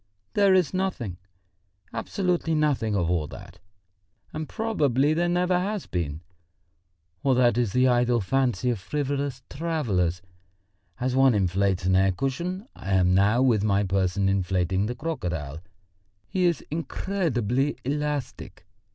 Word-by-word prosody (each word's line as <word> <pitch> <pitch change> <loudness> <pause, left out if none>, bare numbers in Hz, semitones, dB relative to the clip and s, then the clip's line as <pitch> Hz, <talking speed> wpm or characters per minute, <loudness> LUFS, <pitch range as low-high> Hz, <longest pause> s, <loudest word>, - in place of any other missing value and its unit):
"There 200 -2 +4
is 180 -5 +2
nothing, 180 - -2 0.8
absolutely 175 -4 -1
nothing 140 -9 +1
of 90 -4 +1
all 85 -3 0
that, 90 +4 -11 0.7
and 155 0 -5
probably 150 - +1
there 175 +2 +1
never 180 +1 +2
has 205 +1 -2
been. 80 -3 -3 1.0
All 135 -2 +2
that 120 -3 +4
is 120 -4 +1
the 125 +3 +3
idle 120 -1 +3
fancy 125 +3 +1
of 115 - -3
frivolous 140 +3 -3
travellers. 105 - -1 0.8
As 125 +1 -1
one 135 -3 +5
inflates 95 -1 +1
an 95 0 +3
air 95 +1 +4
cushion, 170 - -3
I 95 - -4
am 90 -1 +3
now 105 +6 +4
with 115 -6 +3
my 100 -1 +2
person 95 0 0
inflating 95 0 +1
the 120 - -3
crocodile. 85 - -4 0.7
He 185 -1 0
is 170 -3 +1
incredibly 150 - -1
elastic. 150 0 -3
125 Hz, 135 wpm, -26 LUFS, 95-155 Hz, 1.0 s, one